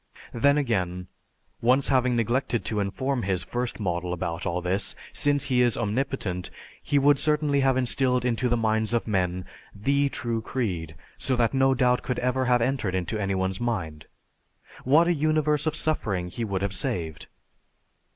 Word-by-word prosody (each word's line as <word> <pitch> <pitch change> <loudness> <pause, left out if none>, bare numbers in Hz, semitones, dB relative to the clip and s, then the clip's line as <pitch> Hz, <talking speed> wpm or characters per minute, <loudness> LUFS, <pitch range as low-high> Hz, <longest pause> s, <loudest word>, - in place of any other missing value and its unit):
Then 140 +5 +3
again, 90 -9 -1 0.5
once 130 +4 +3
having 130 -2 +2
neglected 120 +1 0
to 105 - 0
inform 125 +7 -1
his 95 -4 -1
first 120 +6 -4
model 90 -3 -2
about 85 -1 -3
all 90 +1 -1
this, 95 +3 -1 0.2
since 145 0 +1
He 125 -2 +2
is 120 -2 +3
omnipotent, 110 -5 -2 0.3
he 145 - 0
would 140 0 +4
certainly 150 -2 +1
have 135 -1 +3
instilled 125 0 +2
into 125 +1 0
the 120 - +2
minds 110 0 +1
of 120 - 0
men 90 -3 -1 0.3
"the" 140 +7 +1
true 120 -5 -3
creed 90 - -3 0.2
so 130 - +1
that 120 0 +1
no 135 0 +3
doubt 125 -1 +2
could 125 - -3
have - - -2
ever 130 -1 0 0.2
entered 120 -8 -1
into 95 +4 -2
any 100 0 -1
one's 95 +1 -2
mind. 85 -11 -3 0.8
What 155 +6 +5
a 175 - +3
universe 155 -1 +1
of 155 - 0
suffering 100 - -1
He 115 +6 -4
would 100 -2 -2
have 100 0 -1
saved! 80 -5 -3
120 Hz, 170 wpm, -26 LUFS, 95-135 Hz, 0.8 s, What